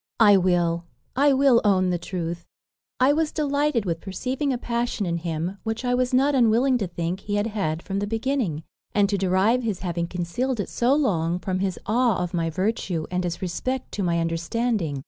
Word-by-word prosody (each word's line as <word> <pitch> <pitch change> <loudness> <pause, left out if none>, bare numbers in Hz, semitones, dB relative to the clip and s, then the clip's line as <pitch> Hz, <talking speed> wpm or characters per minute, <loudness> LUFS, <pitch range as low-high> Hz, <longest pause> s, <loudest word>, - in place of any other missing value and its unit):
I 210 -3 +7
will 175 -2 +2 0.3
I 285 +2 +4
will 265 -3 +5
own 185 -3 +3
the 175 - -1
truth; 170 -1 -5 0.5
I 260 +3 +5
was 315 0 0
delighted 285 -5 0
with 165 -2 -2
perceiving 260 +8 -2
a 255 - 0
passion 235 -2 -2
in 170 -1 -1
him, 170 +3 -3
which 225 +3 -3
I 245 - +1
was 250 +1 +1
not 270 +3 +3
unwilling 250 +1 +3
to 200 - -1
think 175 +1 -3
he 205 +1 -3
had 205 0 +1
had 190 -7 -2
from 195 0 -3
the 205 - -2
beginning, 225 - -1 0.3
and 205 -1 +4
to 200 - +1
derive 195 +6 +2
his 215 -6 -3
having 170 -2 -2
concealed 185 +9 -2
it 205 - -2
so 245 +3 +2
long 175 - +1
from 185 0 -2
his 190 -1 -1
awe 235 0 +2
of 180 0 -3
my 165 -2 0
virtue, 185 -2 -1
and 180 0 0
his 175 +1 -3
respect 255 +9 -3
to 205 - -3
my 170 -2 +1
understanding. 165 - -1
200 Hz, 200 wpm, -24 LUFS, 175-245 Hz, 0.5 s, I